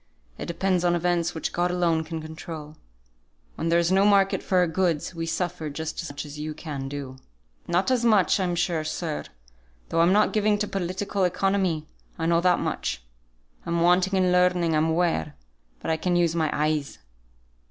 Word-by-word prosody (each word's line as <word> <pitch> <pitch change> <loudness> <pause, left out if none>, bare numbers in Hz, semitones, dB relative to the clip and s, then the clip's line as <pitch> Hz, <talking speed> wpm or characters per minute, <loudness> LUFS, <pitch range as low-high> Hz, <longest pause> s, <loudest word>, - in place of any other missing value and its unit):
It - - -5
depends 180 +1 0
on 175 -1 +3
events 175 -1 0
which 160 - -3
God 175 +1 +1
alone 170 -2 +1
can 160 0 -6
control. 155 -1 -8 0.8
When 165 - -3
there 170 - +4
is 170 +1 +2
no 190 +1 +4
market 200 -1 +4
for 185 - 0
our 180 - +5
goods, 170 -1 0
we 165 -1 -4
suffer 165 -1 -2
just 160 +3 -4
as 170 - -6
much 145 +2 -6
as 150 0 -9
you 155 0 -4
can 140 -4 -5
do." 135 -2 -6 0.5
"Not 180 +8 +1
as 250 -2 +2
much, 215 -4 +4
I'm 180 -2 0
sure, 170 -2 0
sir; 155 0 -3 0.6
though 165 - 0
I'm 170 +2 +5
not 210 +2 +3
given 210 -1 +2
to 210 0 -2
Political 195 +1 -1
Economy, 180 -3 0 0.3
I 165 - -2
know 170 0 +3
that 180 0 +4
much. - - -3 0.6
I'm 170 0 -1
wanting 180 +2 +3
in 185 -1 +3
learning, 180 -2 +3
I'm 155 +1 +2
aware; 165 -3 0 0.5
but - - -2
I 160 - +1
can 175 +2 0
use 170 -2 +2
my 160 -2 +1
eyes. 150 -1 -1
170 Hz, 185 wpm, -25 LUFS, 160-185 Hz, 0.8 s, our